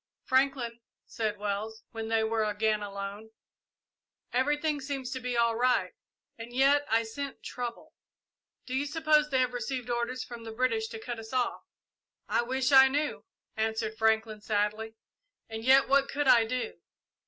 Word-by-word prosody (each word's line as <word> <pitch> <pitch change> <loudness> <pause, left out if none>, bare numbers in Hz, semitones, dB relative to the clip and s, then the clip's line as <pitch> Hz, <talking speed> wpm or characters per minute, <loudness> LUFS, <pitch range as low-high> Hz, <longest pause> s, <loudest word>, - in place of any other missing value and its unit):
"Franklin," 260 -3 +1 0.3
said 215 -2 -3
Wells, 210 +2 -4
when 225 -1 -5
they 225 0 +2
were 220 0 +1
again 215 0 0
alone, 200 +1 -6 1.0
"everything 295 +3 +1
seems 270 -2 -4
to 260 - -3
be 250 -1 -2
all 235 -1 +3
right, 250 +2 +2 0.5
and 230 +1 -8
yet 275 +3 +3
I 225 +1 +3
scent 275 +5 -6
trouble. 250 +6 -6 0.7
Do 255 - -6
you 275 +2 0
suppose 305 0 +3
they 265 - +1
have 250 -1 0
received 245 +1 -3
orders 240 +2 -2
from 235 -1 -9
the 225 - -7
British 225 -2 0
to 225 0 -8
cut 235 +1 -5
us 225 +2 -10
off?" 250 -2 0 0.7
"I - - +2
wish 260 +3 0
I 265 -1 +9
knew," 290 +3 -2 0.3
answered 220 0 -1
Franklin, 220 -1 +1
sadly; 215 +1 -1 0.5
"and 220 0 -6
yet 265 +2 +6
what 275 0 +3
could 290 0 -1
I 235 -3 +6
do?" 255 - -3
235 Hz, 160 wpm, -29 LUFS, 220-265 Hz, 1.0 s, I